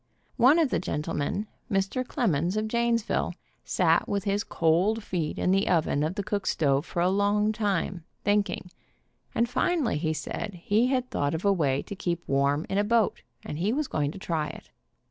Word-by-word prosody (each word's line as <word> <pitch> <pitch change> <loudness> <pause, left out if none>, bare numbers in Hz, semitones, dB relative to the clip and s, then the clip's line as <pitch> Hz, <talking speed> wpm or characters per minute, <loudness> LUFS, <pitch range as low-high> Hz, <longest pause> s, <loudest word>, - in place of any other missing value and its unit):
One 260 +6 +6
of 315 -6 +2
the - - +1
gentlemen, 155 +4 -2 0.3
Mr. 195 +6 0
demons 180 - +1
of 215 0 0
Janes 235 0 +1
ville, 175 - -1 0.3
sat 165 -2 +2
with 200 -1 0
his 205 0 0
cold 185 +5 +1
feet 170 -6 -2
in 180 - +1
the 195 +1 +2
oven 160 -4 +2
of 155 +4 -1
the 200 - -2
cook 200 0 -2
stove 140 0 +1
for 170 - -1
a - - +3
long 205 +2 +2
time, 195 -5 -1 0.2
thinking, 205 -3 0 0.6
and 235 - +2
finally 255 - 0
he 160 0 0
said 185 +3 -5
he 220 +4 +3
had 255 -1 -1
thought 145 +2 0
of 160 - -4
a 200 - +5
way 140 -7 +1
to. 200 - -7
keep 175 -2 -3
warm 140 +3 +1
in 195 - 0
a - - +3
boat, 225 0 +2 0.2
and 150 - -5
he 195 +5 +1
was 290 +3 0
going 145 -2 -1
to 160 - -8
try 165 -5 -2
it. - - -10
195 Hz, 195 wpm, -27 LUFS, 160-215 Hz, 0.6 s, One